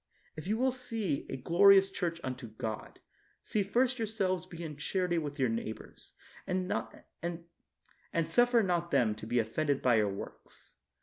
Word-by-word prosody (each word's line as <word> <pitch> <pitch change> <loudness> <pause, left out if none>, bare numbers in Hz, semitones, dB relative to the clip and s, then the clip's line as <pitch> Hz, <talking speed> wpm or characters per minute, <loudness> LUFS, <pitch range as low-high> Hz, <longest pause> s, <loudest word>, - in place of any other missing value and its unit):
If 155 +3 -7
you 215 +2 +1
will 260 +2 +2
build 225 - -2
a - - -3
glorious 195 +6 +6
church 170 -3 -2
unto 130 -1 -4
bod, 110 0 -6 0.4
see 210 - 0
first 245 +6 +1
yourselves 190 -5 -1
to - - -26
be 170 0 -7
in 155 -2 -5
charity 175 +3 0
with 145 -2 -5
your 130 -3 +2
neighbors, 115 -1 -6 0.3
and 185 0 -1 1.6
suffer 245 -1 +4
not 175 -2 0
them 125 -8 +3
to 110 +1 -9
be 120 +2 0
offended 135 +5 0
by 125 -3 +5
your 105 -2 +3
works. 100 - -9
170 Hz, 160 wpm, -32 LUFS, 130-200 Hz, 1.6 s, glorious